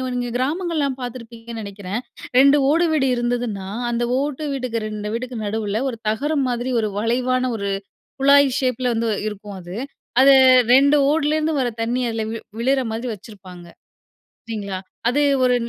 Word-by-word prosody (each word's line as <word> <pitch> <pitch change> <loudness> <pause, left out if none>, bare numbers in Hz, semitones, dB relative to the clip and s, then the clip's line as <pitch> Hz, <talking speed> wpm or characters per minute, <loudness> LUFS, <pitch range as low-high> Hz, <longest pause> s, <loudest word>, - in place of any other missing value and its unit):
நீங்க 245 -1 -2
கிராமங்கள்லாம் 295 -1 -1
பார்த்துருப்பீங்கன்னு 230 -2 -7
நினைக்கிறேன், 200 +2 -5 0.4
2 280 +2 +6
ஓடு 335 +3 +3
வீடு 270 -3 +2
இருந்ததுன்னா, 240 -5 -2 0.2
அந்த 240 0 -1 0.2
ஓட்டு 290 +1 -3
வீட்டுக்கு 245 -4 -3
2 210 0 -5
வீட்டுக்கு 245 +1 -4
நடுவுல, 210 +1 -2
ஒரு 230 - -6
தகரம் 280 +5 0
மாதிரி 245 +1 -2
ஒரு 215 -1 0
வளைவான 255 +3 0
ஒரு 200 -1 -3 0.5
குழாய் 280 -1 +5
ஷேப் 255 -1 -1
ல - - +3
வந்து 230 0 0 0.2
இருக்கும் 205 -1 -8
அது. 175 +1 -9 0.5
அதை 275 +1 +8 0.4
2 280 +2 +5
ஓடுலேருந்து 310 +1 +1
வர 250 - +1
தண்ணி 240 +3 -1
அதில 225 -1 -2
வி 230 - -4 0.2
விழுற 265 +3 +2
மாதிரி 235 +3 -4
வச்சிருப்பாங்க. 190 -4 -13 0.8
சரிங்களா? 200 -4 -4 0.3
அது 275 +4 +1 0.2
ஒரு 250 - +4
240 Hz, 150 wpm, -21 LUFS, 220-270 Hz, 0.8 s, அதை